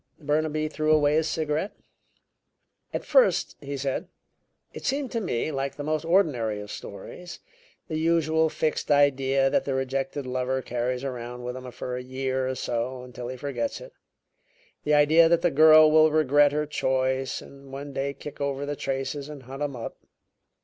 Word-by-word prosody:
Burnaby 155 0 0
threw 155 0 0
away 150 -1 +4
his 160 +1 +2
cigarette. 155 +5 -1 1.2
"At - - -4
first," - - +3
he 140 -1 -5
said, 135 0 -2 0.7
"it - - -9
seemed 275 -1 -1
to 230 - -1
me 155 - -1
like 135 -1 -3
the 145 - -6
most 155 +1 -1
ordinary 140 - +2
of 105 0 -8
stories 175 - -9 0.5
the 155 -1 -2
usual 160 -1 +2
fixed 155 0 -2
idea 135 -2 +3
that - - +2
the 135 - -2
rejected 135 +1 -2
lover 130 +1 -1
carries 125 +2 -2
around 125 -2 -5
with 125 0 -4
him 130 0 -7
for 125 +1 -5
a - - -4
year 130 0 -2
or 130 - -2
so 125 +1 -3
until 125 -1 -8
he 130 +1 -6
forgets 145 - -3
it; - - -12 0.9
the 150 0 +3
idea 160 +3 +6
that 170 0 +3
the 175 - +3
girl 155 +1 +7
will 155 0 +6
regret 145 -1 +4
her 150 +1 0
choice 130 -2 0
and 140 -1 -14
one 140 +1 -7
day 140 +1 -1
kick 145 +1 -10
over 140 0 -1
the 145 0 -3
traces 135 +1 -3
and 145 -3 -9
hunt 135 +3 -9
him 145 -2 -2
up. 115 - -6
140 Hz, 175 wpm, -26 LUFS, 130-155 Hz, 1.2 s, girl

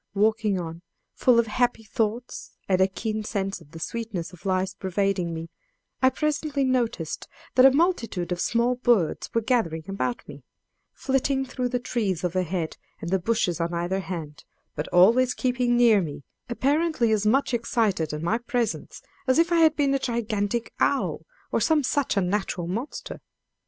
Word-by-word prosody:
Walking 215 -1 +2
on 165 -1 -6 0.3
full 250 -2 +4
of 235 - +4
happy 235 +1 0
thoughts 225 +2 -3
and 185 -1 +2
a 190 - +5
keen 215 +2 -3
sense 195 -3 -3
of 145 - -17
the 165 +1 -10
sweetness 200 -3 -4
of 180 +2 -9
life 185 0 +1
pervading 190 -2 0
me, 165 0 -6 0.5
I 260 - +6
presently 295 +1 -1
noticed 240 - -1 0.3
that 255 +1 +8
a - - +5
multitude 245 - 0
of 180 - -1
small 235 +2 +2
birds 240 - +1
were 230 - +1
gathering 210 -10 0
about 200 +5 -3
me, - - -11 0.5
flitting 270 0 0
through 250 -1 -3
the 245 - -1
trees 205 -8 -2
overhead 180 -2 -2 0.2
and 170 - -5
the 190 - +2
bushes 180 -3 0
on 170 +1 -1
either 175 +3 -1
hand, 165 -6 -6 0.3
but 150 - -3
always 235 +8 +5
keeping 245 -1 +1
near 230 -4 +5
me, 145 -4 -6 0.3
apparently 280 0 +1
as 210 -1 +2
much 265 +3 +2
excited 220 -8 0
at 150 +1 -5
my 215 +7 +1
presence 240 -2 -3 0.2
as 260 - +3
if 335 +1 +3
I 340 - +4
had 320 -1 +5
been 280 -2 +2
a 275 - +2
gigantic 230 -2 -2
owl, - - 0 0.2
or - - +1
some 315 -2 +3
such 270 -3 0
unnatural 190 -2 0
monster. 225 - -5
220 Hz, 165 wpm, -25 LUFS, 180-250 Hz, 0.5 s, that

